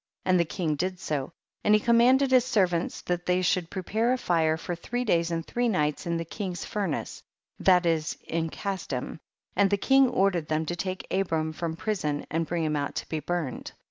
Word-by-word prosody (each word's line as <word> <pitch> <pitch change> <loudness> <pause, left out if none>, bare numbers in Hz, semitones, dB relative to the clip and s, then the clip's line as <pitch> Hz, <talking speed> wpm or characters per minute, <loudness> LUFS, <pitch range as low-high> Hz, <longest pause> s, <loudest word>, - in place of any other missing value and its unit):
And 185 -1 +4
the 170 - +3
king 160 0 -2
did 185 +4 -2
so, 145 -4 -3 0.3
and 210 - +5
he - - +4
commanded 245 +4 +4
his 255 -2 +6
ser 220 -6 +3
vants 175 -1 -3
that 175 0 -2
they 180 0 +2
should 180 -2 +1
prepare 215 +5 0
a - - +1
fire 160 -7 +1
for 175 - -4
three 245 +8 -3
days 170 -5 +2
and 165 -1 -2
three 245 0 0
nights 150 -5 0
in 170 0 0
the 165 - -3
king's 180 -1 -5
furnace, 195 -8 -3 0.4
that 180 -2 +4
is 160 -2 0
in 165 0 -2
Casdim; 165 -9 -4 0.4
and 200 -1 +4
the 200 - +2
king 270 +5 +4
ordered 185 -7 +1
them 155 +1 0
to 175 - -2
take 185 +2 -4
Abram 160 -5 0
from 165 0 -3
prison 160 -7 -2
and 165 +1 0
bring 170 -1 -1
him 155 -1 0
out 145 -1 -2
to - - -4
be 160 - -2
burned. 165 -5 -3
175 Hz, 205 wpm, -27 LUFS, 160-200 Hz, 0.4 s, his